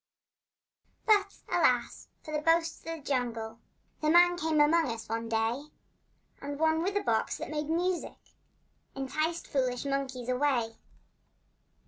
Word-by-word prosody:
But, 410 -2 +3
alas, - - +1 0.2
for 310 - -8
the 300 - 0
boasts 330 +1 +2
of - - -25
the 300 - -15
jungle! 230 -5 -2 0.4
The 305 - +2
men 350 +2 +6
came 320 -2 0
among 310 0 +4
us 230 -1 -5
one 230 +1 -3
day, 225 +5 0 0.8
And 285 0 -5
one 320 +1 +2
with 390 +4 0
a - - -1
box 230 -3 0
that - - -6
made 300 0 -3
music 350 +2 -1 0.8
Enticed 310 +5 -2
foolish 255 -2 -1
monkeys 270 -3 -2
away. 250 -3 +1
290 Hz, 135 wpm, -30 LUFS, 245-330 Hz, 0.8 s, men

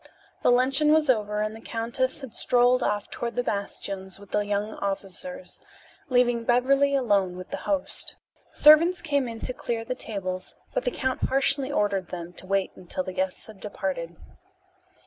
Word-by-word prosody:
The - - +3
luncheon 270 +5 +4
was 305 -3 +5
over 210 -2 -1
and 215 +1 -3
the 225 - -11
countess 240 +5 -2
had 265 -4 -8
strolled 245 +1 +3
off 205 -1 -1
toward 235 0 -4
the 245 - 0
bastions 195 -3 -4
with 200 -1 -15
the 210 - +2
young 205 +1 -2
officers, 200 +8 -5 0.5
leaving 245 -2 +3
Beverly 275 +4 +3
alone 200 -8 +1
with 185 - -9
the - - -2
host. 295 -2 -1 0.4
Servants 325 +4 +6
came 285 -5 0
in 230 -1 -7
to 255 - -3
clear 230 -2 -3
the 255 - -2
tables, 185 -6 -5 0.2
but - - -1
the - - +3
count 260 - -1
harshly 275 +1 +3
ordered 200 -8 0
them 175 -1 -7
to 185 - -2
wait 195 0 +1
until 185 +1 -4
the 185 - -6
guests 185 0 -2
had 215 -3 -13
departed. 185 -5 -4
225 Hz, 170 wpm, -26 LUFS, 195-260 Hz, 0.5 s, Servants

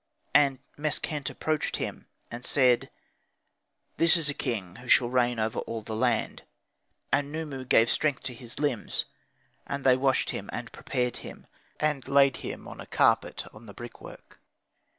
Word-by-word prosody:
And 140 -3 +5 0.2
Meskhent 150 -1 -1
approached 155 -1 -1
him - - -5 0.2
and 120 +1 -7
said, 125 -3 +3 1.1
"This 165 0 +6
is 155 -3 +1
a - - 0
king 105 -10 -3
who 125 +1 -12
shall 120 0 +5
reign 125 -1 +2
over 110 0 -1
all 115 -1 -5
the 110 0 -5
land." 120 0 0 0.7
And 145 0 +2
Khnumu 145 -5 -5
gave 115 - +6
strength 145 +2 +1
to 125 - -4
his 120 -1 -8
limbs. 145 -7 -1 0.6
And 140 0 -3
they 130 -1 +6
washed 130 0 +2
him, - - -6
and - - -5
prepared 125 -3 -2
him, - - -10 0.3
and 150 -4 0
layed 140 -1 +5
him - - -7
on - - -9
a - - -10
carpet - - +2
on 115 +2 -13
the 100 - -11
brickwork. 120 0 -11
130 Hz, 160 wpm, -28 LUFS, 120-145 Hz, 1.1 s, This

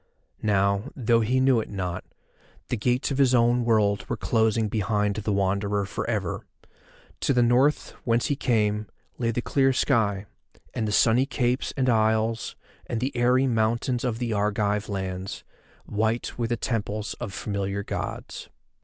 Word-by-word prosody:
Now, 100 -1 +1
though 115 -2 +2
he 125 +4 +1
knew 130 -2 +4
it 110 - -5
not, 90 -3 -4 0.7
the - - 0
gates 125 +5 0
of 135 - -1
his 130 -2 +4
own 120 +1 +3
world 105 -3 +1
were - - -1
closing 110 -1 +1
behind 105 -1 0
the 105 0 -2
Wanderer 100 +1 0
for 100 - -4
ever. 105 -7 -2 0.8
To - - +1
the 125 -1 +4
North, 125 +5 +2
whence 115 0 +1
he 145 - 0
came, 105 -5 0 0.3
lay 115 -2 0
the 115 +1 -1
clear 135 -1 +2
sky, 105 -7 +1 0.5
and 110 - -1
the - - -1
sunny 120 +5 +4
capes 125 -2 0
and 130 -1 +1
isles, 110 0 +1 0.3
and 115 - -2
the 130 +2 -2
airy 125 +2 +3
mountains 120 +1 0
of 120 -3 -1
the 120 -2 -2
Argive 105 0 0
lands, 95 -1 -4 0.4
white 110 +3 -1
with 115 -2 -2
the 120 - 0
temples 105 -3 -2
of 120 -5 -5
familiar 100 0 -3
Gods. - - -5
110 Hz, 160 wpm, -25 LUFS, 105-120 Hz, 0.8 s, knew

